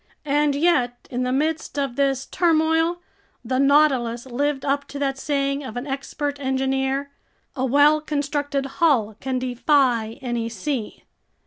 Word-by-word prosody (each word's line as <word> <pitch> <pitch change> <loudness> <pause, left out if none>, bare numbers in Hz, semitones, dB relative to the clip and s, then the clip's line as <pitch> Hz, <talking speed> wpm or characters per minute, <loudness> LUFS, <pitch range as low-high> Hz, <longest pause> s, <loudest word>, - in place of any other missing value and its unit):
And 290 0 +2
yet 285 -6 +1
in 250 0 -2
the 250 0 0
midst 310 +3 -1
of 275 -4 -1
this 270 -1 +1
turmoil, 325 0 +1 0.4
the 255 +2 0
Nautilus 270 -5 +3
lived 270 +2 -1
up 280 0 0
to 285 - -8
that 270 -1 -1
saying 275 -1 -1
of 250 -3 -7
an 245 - -4
expert 285 +1 -4
engineer: 265 +1 -1 0.4
"A 260 -2 -1
well 290 +4 +4
constructed 285 -2 -2 0.2
hull 235 -10 +3
can 265 -1 -2
defy 250 -3 +1
any 240 -3 -3
sea!" 230 +1 -4
275 Hz, 140 wpm, -23 LUFS, 255-290 Hz, 0.4 s, well